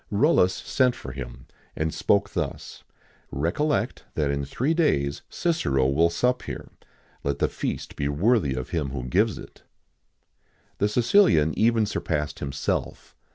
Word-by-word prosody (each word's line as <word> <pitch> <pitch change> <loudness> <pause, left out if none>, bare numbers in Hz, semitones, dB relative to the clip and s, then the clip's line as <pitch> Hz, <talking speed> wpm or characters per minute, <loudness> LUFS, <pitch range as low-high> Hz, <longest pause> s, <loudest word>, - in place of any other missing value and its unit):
Rullus 100 - +3
sent 125 -2 +1
for 65 - -8
him, - - -8 0.3
and 80 0 -1
spoke 100 -1 +1
thus: - - -5 0.5
"Recollect 90 - -1
that 75 -2 +1
in 70 0 -1
three 130 - 0
days 70 - +1
Cicero 70 - 0
will 80 +5 +3
sup 125 +8 +1
here: - - -7 0.5
let 70 0 -1
the - - +2
feast - - -4
be 70 - -1
worthy 80 - +2
of 65 - -5
him 75 -5 -1
who 65 -2 -5
gives 95 - +1
it." - - -12 1.2
The 105 - +2
Sicilian 115 - +4
even 115 0 +3
surpassed 75 -7 -2
himself. 70 0 -3
85 Hz, 140 wpm, -25 LUFS, 70-120 Hz, 1.2 s, Sicilian